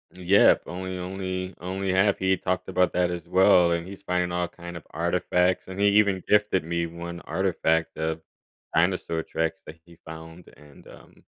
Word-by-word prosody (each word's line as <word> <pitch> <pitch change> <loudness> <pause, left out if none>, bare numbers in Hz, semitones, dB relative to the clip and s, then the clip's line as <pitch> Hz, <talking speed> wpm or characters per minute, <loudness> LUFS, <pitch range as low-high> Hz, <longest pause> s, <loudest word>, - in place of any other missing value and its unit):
Mm, 90 -1 -11
yep. 100 +2 +5
Only 95 +1 -5
only 95 0 -4
only 95 +2 -3
have 95 +2 +3
he 95 0 +1
talked 90 0 -2
about 90 -1 +1
that 90 -1 +1
as 85 -2 -6
well, 95 -2 +5
and 85 0 -1
he's 100 +1 -10
finding 90 -1 -1
all 90 0 -1
kind 85 0 -10
of 80 - -12
artifacts. 90 +2 0
And 95 +1 -8
he 100 - +4
even 100 -2 +3
gifted 105 -3 +3
me 85 +1 -2
one 85 +1 -7
artifact 80 -3 0
of 80 0 -2 0.5
dinosaur 85 -1 +1
tracks 80 +4 -3
that 80 +2 -11
he 85 -1 -18
found, 80 +2 -11
and, 75 -1 -18
um - - -17
90 Hz, 180 wpm, -25 LUFS, 85-95 Hz, 0.5 s, yep